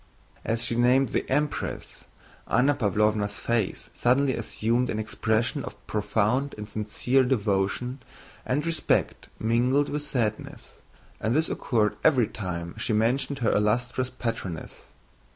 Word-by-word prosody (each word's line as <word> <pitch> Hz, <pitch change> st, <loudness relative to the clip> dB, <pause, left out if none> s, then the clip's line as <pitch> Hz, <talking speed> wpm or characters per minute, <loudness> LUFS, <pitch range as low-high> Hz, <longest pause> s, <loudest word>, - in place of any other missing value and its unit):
As 115 Hz, +1 st, -1 dB
she 120 Hz, -, -1 dB
named 125 Hz, +2 st, +4 dB
the -, -, -2 dB
Empress, 145 Hz, +2 st, -2 dB, 0.4 s
Anna 130 Hz, +5 st, +3 dB
Pávlovna's 105 Hz, -3 st, +1 dB
face 115 Hz, -5 st, -1 dB
suddenly 130 Hz, +2 st, +2 dB
assumed 115 Hz, +2 st, 0 dB
an 110 Hz, -, -1 dB
expression 110 Hz, +4 st, 0 dB
of 125 Hz, -, -7 dB
profound 110 Hz, +6 st, 0 dB
and 105 Hz, 0 st, -6 dB
sincere 110 Hz, +5 st, +1 dB
devotion 125 Hz, +1 st, 0 dB, 0.4 s
and 145 Hz, +4 st, -1 dB
respect 165 Hz, -1 st, 0 dB
mingled 125 Hz, +6 st, +2 dB
with 150 Hz, -, -2 dB
sadness, 120 Hz, -8 st, -3 dB, 0.4 s
and 110 Hz, +4 st, 0 dB
this 160 Hz, +1 st, +2 dB
occurred 105 Hz, -4 st, 0 dB
every 130 Hz, -7 st, +5 dB
time 85 Hz, -5 st, -5 dB
she -, -, -1 dB
mentioned 125 Hz, +6 st, +1 dB
her -, -, +4 dB
illustrious 120 Hz, +5 st, +1 dB
patroness. 115 Hz, -9 st, -5 dB
115 Hz, 125 wpm, -26 LUFS, 105-130 Hz, 0.4 s, every